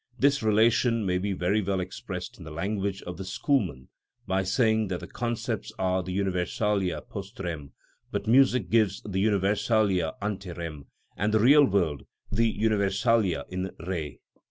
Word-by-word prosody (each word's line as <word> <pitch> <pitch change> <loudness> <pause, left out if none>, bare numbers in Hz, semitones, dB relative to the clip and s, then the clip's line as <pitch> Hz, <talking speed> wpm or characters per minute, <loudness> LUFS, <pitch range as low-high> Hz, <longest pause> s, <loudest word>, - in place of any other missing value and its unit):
This 140 +1 +3
relation 115 +1 +3
may 90 -1 +1
be 100 +2 -2
very 95 +4 +1
well 95 -1 -1
expressed 90 0 -6
in - - -9
the 80 - -8
language 95 +4 -2
of 90 -2 -7
the 95 - -5
schoolmen 95 - -1 0.4
by 95 0 +1
saying 110 +2 +2
the 90 -2 -4
concepts 120 -2 -3
are 95 0 +1
the 90 +1 -4
universalia 95 0 -1
post 100 0 -8
rem, 80 -7 -5 0.4
but - - -3
music 125 -2 +4
gives 110 -4 +2
the 95 -1 -1
universalia 100 -3 +2
ante 100 -3 -4
rem, 80 -5 -7 0.3
and 105 +2 0
the 110 - +3
real 140 +6 +7
world 90 - 0 0.2
the 115 +1 +2
universalia 105 -4 +1
in 95 +1 -3 0.2
re. 80 -6 -4
100 Hz, 155 wpm, -27 LUFS, 90-110 Hz, 0.4 s, real